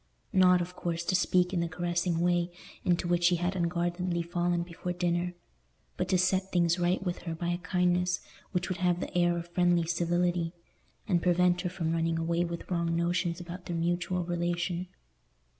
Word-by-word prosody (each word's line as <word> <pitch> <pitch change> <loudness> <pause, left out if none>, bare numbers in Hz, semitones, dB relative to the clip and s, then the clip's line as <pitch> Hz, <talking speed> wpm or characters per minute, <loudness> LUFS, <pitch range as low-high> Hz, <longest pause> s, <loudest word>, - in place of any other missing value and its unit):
Not, 180 -1 +6
of 180 +1 -5
course, 170 -1 -2
to 185 - +1
speak 180 0 +2
in 180 - +1
the 170 - 0
caressing 175 0 -1
way 175 0 +2 0.3
into 175 0 +1
which 175 0 +3
he 180 - +4
had 175 +2 -1
unguardedly 175 0 -1
fallen 175 0 0
before 175 +1 -5
dinner, 175 0 -1 0.6
but - - -1
to 185 - +4
set 190 +1 +1
things 170 0 +2
right 175 +2 +1
with 175 -1 -2
her 165 -2 -5
by 170 +1 -3
a 175 0 -1
kindness 180 0 +1 0.3
which 180 -2 -1
would 185 - -3
have 180 -1 +2
the - - -5
air 175 -1 +3
of 170 0 -6
friendly 175 -1 +2
civility, 175 0 0 0.5
and 175 -2 +2
prevent 180 0 +3
her 180 - -2
from 170 -3 -2
running 165 0 0
away 170 +1 +1
with 170 -1 -5
wrong 170 -1 0
notions 170 0 0
about 175 +1 -8
their 170 -2 -2
mutual 175 +1 0
relation. 175 +1 -1
175 Hz, 185 wpm, -30 LUFS, 170-180 Hz, 0.6 s, Not